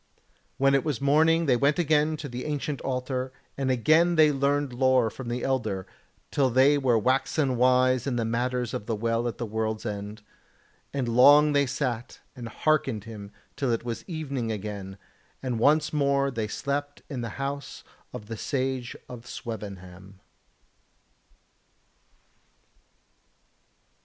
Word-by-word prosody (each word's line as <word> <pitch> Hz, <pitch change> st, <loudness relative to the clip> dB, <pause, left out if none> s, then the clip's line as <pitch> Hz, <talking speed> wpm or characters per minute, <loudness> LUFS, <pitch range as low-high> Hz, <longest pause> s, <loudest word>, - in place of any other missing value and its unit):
When 135 Hz, 0 st, +3 dB
it 135 Hz, -, +3 dB
was 150 Hz, -5 st, -2 dB
morning 160 Hz, +4 st, +3 dB
they 130 Hz, -4 st, +4 dB
went 140 Hz, +5 st, +2 dB
again 155 Hz, -2 st, +2 dB
to 145 Hz, -, -6 dB
the 125 Hz, -1 st, -6 dB
ancient 145 Hz, -1 st, -3 dB
altar, 130 Hz, 0 st, -2 dB, 0.2 s
and 135 Hz, -1 st, -1 dB
again 155 Hz, +8 st, +4 dB
they 155 Hz, -2 st, +6 dB
learned 140 Hz, -1 st, 0 dB
lore 130 Hz, -2 st, +3 dB
from 130 Hz, -3 st, -7 dB
the 120 Hz, +1 st, -3 dB
Elder, 110 Hz, -8 st, -1 dB, 0.5 s
till 135 Hz, -2 st, +2 dB
they 130 Hz, +4 st, +5 dB
were 125 Hz, -4 st, +3 dB
waxen 130 Hz, +3 st, +1 dB
wise 130 Hz, 0 st, +3 dB
in 130 Hz, -, 0 dB
the 115 Hz, -1 st, 0 dB
matters 120 Hz, +1 st, -1 dB
of 105 Hz, -, -5 dB
the 115 Hz, -, 0 dB
Well 115 Hz, +2 st, 0 dB
at 115 Hz, -, -4 dB
the 120 Hz, -, -3 dB
World's 110 Hz, 0 st, -3 dB
End, 105 Hz, 0 st, -5 dB, 0.7 s
and 135 Hz, -3 st, -2 dB
long 145 Hz, +5 st, +6 dB
they 140 Hz, -1 st, +3 dB
sat 125 Hz, -3 st, -3 dB, 0.2 s
and 120 Hz, -3 st, -7 dB
hearkened 135 Hz, -5 st, 0 dB
him 105 Hz, -2 st, -9 dB, 0.2 s
till 135 Hz, -, -1 dB
it 115 Hz, 0 st, -1 dB
was 115 Hz, -2 st, -4 dB
evening 140 Hz, -, -3 dB
again, 100 Hz, -2 st, -6 dB, 0.5 s
and 125 Hz, -3 st, -2 dB
once 150 Hz, +5 st, +3 dB
more 140 Hz, -1 st, +2 dB
they 115 Hz, -4 st, -2 dB
slept 145 Hz, +5 st, -3 dB
in 130 Hz, -4 st, -5 dB
the 115 Hz, -, -4 dB
house 140 Hz, +1 st, -5 dB, 0.3 s
of 105 Hz, -, -8 dB
the 115 Hz, +1 st, -6 dB
Sage 130 Hz, -1 st, -2 dB
of 125 Hz, -1 st, -10 dB
Swevenham. 95 Hz, -5 st, -8 dB
130 Hz, 145 wpm, -27 LUFS, 115-140 Hz, 0.7 s, they